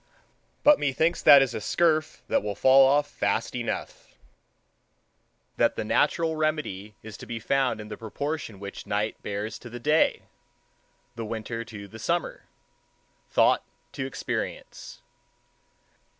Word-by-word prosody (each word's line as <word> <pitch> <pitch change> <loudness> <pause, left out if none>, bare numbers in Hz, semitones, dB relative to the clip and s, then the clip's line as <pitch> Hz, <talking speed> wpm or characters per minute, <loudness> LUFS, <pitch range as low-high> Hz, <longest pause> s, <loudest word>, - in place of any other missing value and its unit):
But 295 0 +6
methinks 155 +4 +1
that 140 -1 +8
is 125 -3 -3
a - - -4
scurf 155 +6 +1
that - - +2
will 105 -1 -4
fall 130 +5 +6
off 145 +2 +3
fast - - -1
enough—that - - -6
the - - -3
natural 165 -1 +1
remedy 150 -10 -2
is 110 -2 -9
to - - -11
be 115 -1 -4
found 130 -1 0
in 105 - -8
the 105 -1 -7
proportion 130 -1 -5
which 100 0 -8
the - - -17
night 105 +1 -1
bears 105 +2 -4
to 120 - -11
the 120 +1 -8
day, 150 +5 +2 0.9
the 115 - -5
winter 115 +1 -4
to 105 -4 -9
the 110 +3 -12
summer, - - -2 0.8
thought - - +3 0.3
to 130 - -4
experience. 135 - -6
120 Hz, 135 wpm, -26 LUFS, 105-145 Hz, 0.9 s, that